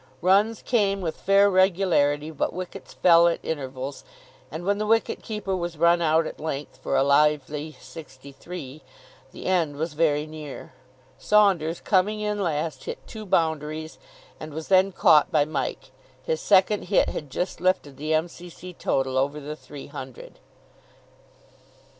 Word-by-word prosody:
Runs 200 Hz, +6 st, +2 dB
came 200 Hz, -5 st, +1 dB
with 160 Hz, -3 st, -3 dB
fair 195 Hz, +1 st, +4 dB
regularity, 175 Hz, -6 st, +2 dB
but 155 Hz, -, -2 dB
wickets 185 Hz, +1 st, -8 dB
fell 170 Hz, -1 st, +6 dB
at 170 Hz, -, +1 dB
intervals, 135 Hz, -2 st, -5 dB, 0.5 s
and 160 Hz, +4 st, -7 dB
when 200 Hz, +1 st, +1 dB
the 215 Hz, -, -2 dB
wicket 225 Hz, +1 st, +1 dB
keeper 210 Hz, -4 st, -3 dB
was 175 Hz, -2 st, -4 dB
run 170 Hz, +2 st, +4 dB
out 160 Hz, 0 st, +3 dB
at -, -, -7 dB
length 150 Hz, -2 st, -5 dB
for -, -, -3 dB
a 135 Hz, -, +4 dB
lively 150 Hz, +1 st, +1 dB
sixty 140 Hz, -4 st, -12 dB
three, 155 Hz, -1 st, -9 dB, 0.5 s
the -, -, -10 dB
end 170 Hz, -6 st, +1 dB
was 160 Hz, +2 st, -3 dB
very 150 Hz, -1 st, +1 dB
near. 155 Hz, -2 st, -9 dB, 0.5 s
Saunders, 190 Hz, -6 st, +3 dB
coming 205 Hz, +2 st, +1 dB
in 210 Hz, 0 st, -2 dB
last, 160 Hz, -3 st, -2 dB
hit -, -, -7 dB
two 215 Hz, -2 st, -9 dB
boundaries, 160 Hz, -2 st, -1 dB, 0.4 s
and 155 Hz, -1 st, -8 dB
was 160 Hz, 0 st, -6 dB
then 190 Hz, 0 st, +4 dB
caught 150 Hz, -4 st, +4 dB
by 150 Hz, -2 st, +3 dB
Mike. 155 Hz, -, -4 dB, 0.3 s
His 480 Hz, -1 st, -2 dB
second 200 Hz, +1 st, +3 dB
hit 200 Hz, -, +2 dB
had 150 Hz, -, -6 dB
just 180 Hz, +5 st, -4 dB
lifted 180 Hz, -7 st, 0 dB
the 155 Hz, +2 st, -4 dB
M.C.C. 175 Hz, +2 st, -5 dB
total 130 Hz, -5 st, 0 dB
over 140 Hz, +3 st, -1 dB
the 150 Hz, +1 st, -6 dB
three 145 Hz, -2 st, -11 dB
hundred. 135 Hz, -3 st, -10 dB
160 Hz, 155 wpm, -25 LUFS, 150-185 Hz, 0.5 s, fell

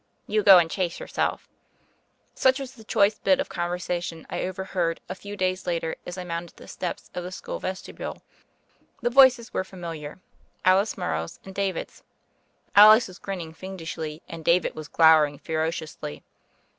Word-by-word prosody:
"You 215 Hz, 0 st, +1 dB
go 195 Hz, -2 st, +9 dB
and 170 Hz, -2 st, +4 dB
chase 175 Hz, 0 st, -2 dB
yourself." -, -, -2 dB, 0.9 s
Such 260 Hz, 0 st, +3 dB
was 270 Hz, -2 st, -6 dB
the 230 Hz, -4 st, -15 dB
choice 210 Hz, -1 st, +2 dB
bit 280 Hz, -1 st, +3 dB
of 280 Hz, -, -2 dB
conversation 175 Hz, -1 st, -3 dB
I -, -, -2 dB
overheard 185 Hz, -2 st, -2 dB
a -, -, -4 dB
few 205 Hz, +2 st, -9 dB
days 185 Hz, 0 st, -1 dB
later 165 Hz, -2 st, -1 dB
as 180 Hz, +1 st, -6 dB
I 180 Hz, -, -4 dB
mounted 170 Hz, -1 st, -6 dB
the -, -, -13 dB
steps 180 Hz, -, -5 dB
of 180 Hz, -, -4 dB
the 180 Hz, -, -6 dB
school -, -, -6 dB
vestibule. 185 Hz, 0 st, -6 dB, 0.8 s
The 240 Hz, -, +1 dB
voices 250 Hz, -3 st, +5 dB
were -, -, 0 dB
familiar 165 Hz, -5 st, -8 dB, 0.2 s
— -, -, -22 dB
^Alice 190 Hz, +3 st, +3 dB
Morrow's 80 Hz, +1 st, -3 dB
and 190 Hz, -, -9 dB
David's. 195 Hz, -2 st, -3 dB, 0.7 s
Alice 215 Hz, +3 st, +9 dB
was 185 Hz, 0 st, -13 dB
grinning 175 Hz, -5 st, -6 dB
fiendishly 165 Hz, -3 st, -6 dB
and 165 Hz, -1 st, -8 dB
David 170 Hz, +2 st, +2 dB
was 155 Hz, -1 st, -8 dB
glowering 155 Hz, -3 st, +5 dB
ferociously. 160 Hz, -1 st, -4 dB
180 Hz, 160 wpm, -25 LUFS, 165-200 Hz, 0.9 s, go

